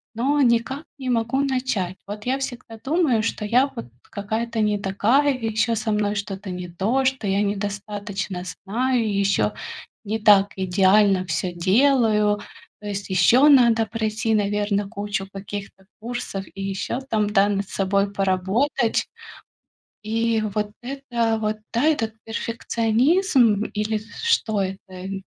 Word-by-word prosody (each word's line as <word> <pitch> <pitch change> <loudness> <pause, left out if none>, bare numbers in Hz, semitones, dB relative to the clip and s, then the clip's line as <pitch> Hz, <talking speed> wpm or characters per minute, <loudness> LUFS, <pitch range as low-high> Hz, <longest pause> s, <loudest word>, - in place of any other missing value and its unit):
но 280 +5 +1
никак 245 +4 +1
не 260 -2 -5
могу 235 +3 +1
начать. 255 -9 -1
Вот, 210 +2 -7
я 260 +2 +1
всегда 245 -3 -6
думаю, 290 -6 +2
что 215 -1 -2
я, 250 +6 +3
вот, - - -6 0.2
какая-то 220 +3 -3
не 210 -1 +2
такая, 230 +9 +2
и 255 -3 -5
ещё, 230 +1 +1
со 220 0 -2
мной 210 0 0
что-то 200 0 -5
не 180 0 -5
то, 220 +10 0
что 260 -5 0
я 195 +1 +1
недостаточно 205 -2 -3
знаю, 230 +5 -1
ещё 150 - +2 0.5
не 220 +1 -2
так 205 -2 +5
идеально 190 +1 +3
всё 175 +2 -2
делаю. 210 +2 +3 0.4
То 210 - -7
есть, 200 -1 -4
ещё 235 +10 +5
надо 235 -5 +5
пройти, 220 +1 -1
наверно, 205 -1 0
кучу 200 -3 -4
каких-то 195 0 -8 0.2
курсов 235 -4 -5
и 195 - -6
ещё 195 +5 -3
там, 210 -2 +1
да, 200 -1 +4
над 200 -1 -2
собой 195 +1 0
поработать. 200 +6 0 1.0
И, 225 +1 0
вот, 210 0 -2
это, 240 -4 -1
вот, 215 0 -1 0.2
да, 235 +4 +1
этот 225 -8 +1
перфекционизм, 230 - +2
или 215 +1 -1 0.2
что 220 - +2
это? 190 0 -6
215 Hz, 135 wpm, -23 LUFS, 200-235 Hz, 1.0 s, так